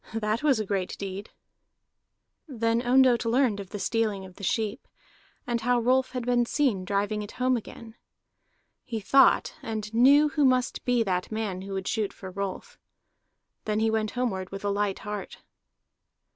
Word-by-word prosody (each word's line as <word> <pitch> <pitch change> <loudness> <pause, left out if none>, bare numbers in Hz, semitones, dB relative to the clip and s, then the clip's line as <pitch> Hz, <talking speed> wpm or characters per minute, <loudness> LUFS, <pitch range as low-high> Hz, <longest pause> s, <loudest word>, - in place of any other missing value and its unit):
That 215 +1 -1
was 285 -6 +3
a 215 - -2
great 190 -2 -2
deed!" 195 +1 -6 1.2
Then 230 -4 0
Ondott 250 -1 +4
learned 230 -2 +2
of 195 -2 -8
the 205 - -6
stealing 205 -1 -1
of 185 -1 -14
the - - -11
sheep, 220 +4 -2 0.6
and 240 -1 -1
how 245 +1 +2
Rolf 255 +2 +1
had 250 -2 -3
been 240 -1 +2
seen 250 -11 +1
driving 205 +2 -1
it 205 - -8
home 255 0 +1
again. 225 0 -8 0.9
He 225 -2 -4
thought, 270 +7 +4
and 220 -4 -5
knew 280 +6 +6
who 295 0 0
must 255 -2 +2
be 245 -2 +2
that 185 -2 -2
man 215 -4 -3
who 195 +1 -7
would 190 0 -4
shoot 215 -3 -1
for 190 -1 -9
Rolf. 200 - -6 0.9
Then 215 0 0
he 220 0 +2
went 220 -1 0
homeward 190 -7 -2
with 195 +1 -7
a - - +1
light 200 -1 -1
heart. 205 -2 -6
220 Hz, 170 wpm, -27 LUFS, 200-245 Hz, 1.2 s, knew